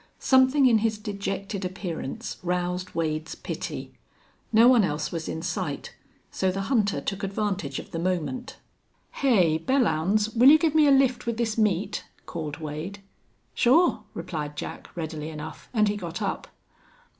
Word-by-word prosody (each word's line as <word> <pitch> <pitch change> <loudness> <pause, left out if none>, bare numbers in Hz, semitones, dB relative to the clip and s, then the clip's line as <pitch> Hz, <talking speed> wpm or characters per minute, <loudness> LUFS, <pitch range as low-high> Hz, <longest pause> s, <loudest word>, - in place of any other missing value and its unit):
Something 260 +1 +4
in 230 -4 +5
his 220 0 0
dejected 200 -1 -4
appearance 180 -6 -5
roused 180 0 -2
Wade's 155 -1 -2
pity. - - -6 0.6
No 230 +2 +7
one 245 -4 +6
else 150 -4 -1
was 165 -2 -4
in 160 - -4
sight, 175 -5 -3 0.4
so 190 - 0
the 195 +1 -2
hunter 210 -6 +2
took 195 -1 -4
advantage 195 -7 -2
of - - -8
the 165 - -3
moment. 185 - -2 0.5
"Hey, 185 - +3
Belllounds, 215 - +1
will 245 +4 +8
you 310 - +9
give 315 -2 +1
me 310 -2 +5
a - - +6
lift 265 -3 +3
with 235 -1 -1
this 225 -2 0
meat?" 205 -4 0 0.2
called 155 -4 -5
Wade. 160 +6 -6 0.5
"Sure," 280 -1 +4
replied 155 -4 -5
Jack, - - -6
readily 155 -2 -4
enough, 155 0 -8
and 215 -3 +3
he 205 0 0
got 175 -2 -5
up. 200 -3 -3
195 Hz, 155 wpm, -26 LUFS, 165-230 Hz, 0.6 s, you